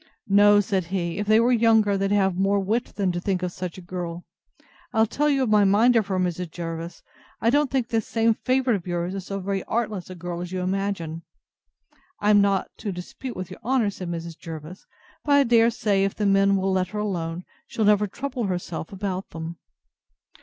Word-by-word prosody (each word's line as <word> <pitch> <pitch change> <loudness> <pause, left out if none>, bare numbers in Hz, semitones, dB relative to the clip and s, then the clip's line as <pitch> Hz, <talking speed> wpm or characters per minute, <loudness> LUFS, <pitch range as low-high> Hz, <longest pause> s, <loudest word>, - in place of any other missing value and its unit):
No, 205 +1 +6
said 190 -3 -1
he, 175 0 -3
if 205 - -2
they 215 +1 +5
were 240 +2 +3
younger, 220 -3 +4
they'd 195 0 0
have 195 -2 +2
more 195 +2 +2
wit 220 +5 0
than 195 -3 +1
to 175 - -3
think 185 -1 -1
of 180 - -1
such 180 0 -6
a 185 - -10
girl; 175 -1 -6 0.7
I'll 220 -1 +4
tell 295 +7 0
you 270 -2 +2
my 210 -2 +4
mind 215 +5 +4
of 220 -3 +3
her, 190 -2 -1
Mrs. 180 -1 -1
Jervis: 165 0 -6 0.4
I 230 - +2
don't 290 0 +2
think 255 -2 -1
this 225 -3 -1
same 225 0 +2
favourite 255 +1 +1
of 185 -3 -6
yours 175 +2 -2
so 195 +1 -4
very 195 0 -2
artless 215 -6 -2
a 185 - -7
girl 175 0 -5
as 180 0 -6
you 185 -1 -2
imagine. 185 -4 -2 1.0
I 210 - +3
am 205 -1 +6
not 200 -1 +1
to 210 - -4
dispute 185 +8 -7
with 185 -1 -6
your - - -9
honour, 240 -3 +1
said 185 -3 -7
Mrs. 170 -1 -6
Jervis; 165 +2 -9 0.4
but 290 - +2
I 285 0 +6
dare 230 -2 +4
say, 205 -4 +1
if 195 - -1
the 210 - -1
men 195 0 +4
will 195 0 0
let 185 -1 +1
her 210 +3 -5
alone, 175 -4 -3 0.2
she'll 220 - -1
never 210 0 +4
trouble 250 +3 -4
herself 175 -3 -4
about 190 -1 -4
them. 165 +1 -7
195 Hz, 210 wpm, -24 LUFS, 180-220 Hz, 1.0 s, No